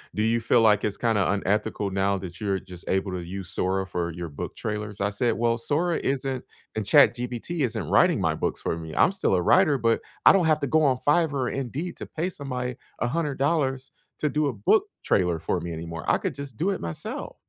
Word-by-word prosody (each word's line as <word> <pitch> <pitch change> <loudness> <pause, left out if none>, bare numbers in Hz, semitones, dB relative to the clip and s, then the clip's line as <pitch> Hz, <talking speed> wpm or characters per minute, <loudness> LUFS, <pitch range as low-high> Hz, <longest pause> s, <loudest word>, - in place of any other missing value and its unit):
do 105 - +1
you 115 +1 +2
feel 115 0 +3
like 105 -2 +4
it's 105 -1 -1
kinda 110 -5 +1
unethical 100 +1 0
now 100 +1 +1
that 90 -2 -8
you're 100 -2 -1
just 90 -2 -12
able 95 0 0
to 90 - -3
use 90 +1 -6
Sora 95 0 0
for 85 -3 -3
your 85 0 -6
book 70 - -6
trailers?" 105 -1 -4
I 100 - +2
said, 115 +3 +1
"Well, 115 0 +1
Sora 160 +8 0
isn't 135 -1 -2 0.3
and 110 -2 -2
ChatGBT 125 +8 +3
isn't 110 - -2
writing - - +4
my - - +2
books - - -2
for 80 - -2
me, 80 -1 -7
I'm - - +4
still 190 - +1
a 90 - +2
writer, 155 - +4
but 115 -2 +1 0.2
I - - +10
don't 190 -3 +3
have 155 -1 +3
to 140 - 0
go 155 +4 +3
on 130 -4 +3
Fiverr 150 +3 +2
or 130 -3 0
Indeed 135 +7 -4
to - - -6
pay 165 +4 -3
somebody 125 -6 -4 0.2
$100 140 0 0 0.3
to 150 - +1
do 150 +1 +1
a 135 - -1
book 115 - +3 0.2
trailer 90 -4 +1
for 90 - -1
me 85 0 -5
anymore, 85 0 -6
I - - +4
could - - -3
just 140 -4 -7
do 180 - +1
it 195 - -3
myself. 85 -1 -5
115 Hz, 220 wpm, -25 LUFS, 95-140 Hz, 0.3 s, I